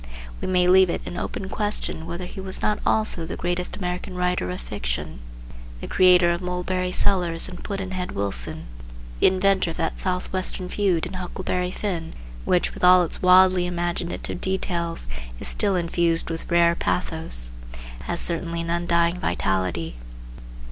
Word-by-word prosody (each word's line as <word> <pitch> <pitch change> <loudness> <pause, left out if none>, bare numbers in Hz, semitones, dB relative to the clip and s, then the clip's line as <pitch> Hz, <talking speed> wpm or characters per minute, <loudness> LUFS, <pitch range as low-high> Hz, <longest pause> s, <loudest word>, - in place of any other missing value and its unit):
We - - -3
may 180 -1 +3
leave 185 0 +6
it - - -2
an - - -6
open 190 - -4
question 205 -5 -2
whether 170 +2 -5
he 190 - -8
was 190 0 -2
not 210 - +1
also 215 -6 +2
the 160 - -5
greatest 175 +1 -3
American 180 0 -4
writer 180 - 0
of 90 - -4
fiction. - - -4 0.6
The - - -6
creator 180 -2 +5
of 170 +1 -2
Mulberry 180 0 -2
Sellers 180 -4 +1
and 180 -1 -9
Pudd'nhead 190 -2 -4
Wilson, 100 0 -1 0.6
the - - +6
inventor 190 -1 +2
of 165 - -6
that 160 - -2
Southwestern 185 0 -2
feud 185 -5 +1
in - - -7
"Huckleberry 180 0 -3
Finn," 180 -4 -4 0.3
which, 180 - +1
with - - -10
all 180 0 +7
its 165 - -1
wildly 185 0 +5
imaginative 175 0 -3
details, 170 - -2 0.3
is - - 0
still 200 -2 +5
infused 170 -1 0
with 165 - -3
rare 170 -1 +4
pathos, 160 - -2 0.5
has 175 - -1
certainly 170 0 -1
an 170 0 -3
undying 170 0 +1
vitality. 90 - -1
180 Hz, 155 wpm, -24 LUFS, 170-185 Hz, 0.6 s, all